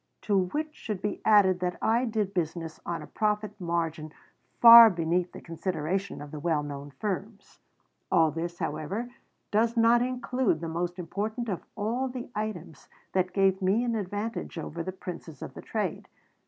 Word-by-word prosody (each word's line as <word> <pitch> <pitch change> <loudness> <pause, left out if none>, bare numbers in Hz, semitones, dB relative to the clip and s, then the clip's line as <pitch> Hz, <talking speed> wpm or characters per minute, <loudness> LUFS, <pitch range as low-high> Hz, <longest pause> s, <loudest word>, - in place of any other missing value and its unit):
To 205 - 0
which 295 +12 0
should 215 -9 -5
be 205 +2 -3
added 200 -4 +5
that 180 0 -2
I 235 +3 +2
did 215 -4 -1
business 165 -2 -3
on 170 -2 -3
a - - -8
profit 210 0 -2
margin 165 -3 -2 0.5
far 235 -1 +11
beneath 175 0 0
the - - -10
consideration 170 +1 -3
of 145 - -11
the 155 - -6
well 155 -1 0
known 145 0 -7
firms. 200 +5 -5 0.5
All 160 -1 +4
this, 170 +2 -4
however, 210 +10 -3 0.4
does 230 +3 +2
not 230 +1 +5
include 250 -6 0
the 165 - -5
most 175 +2 -3
important 215 +7 -3
of 185 - -2
all 230 +5 -1
the 250 -1 -7
items 185 -8 -5 0.2
that 185 -1 +1
gave 195 -1 +2
me 195 +6 +2
an 240 -1 0
advantage 205 0 -4
over 165 +1 -5
the 185 - -4
princes 175 -4 -8
of - - -8
the - - -9
trade. - - -3
190 Hz, 170 wpm, -28 LUFS, 170-220 Hz, 0.5 s, far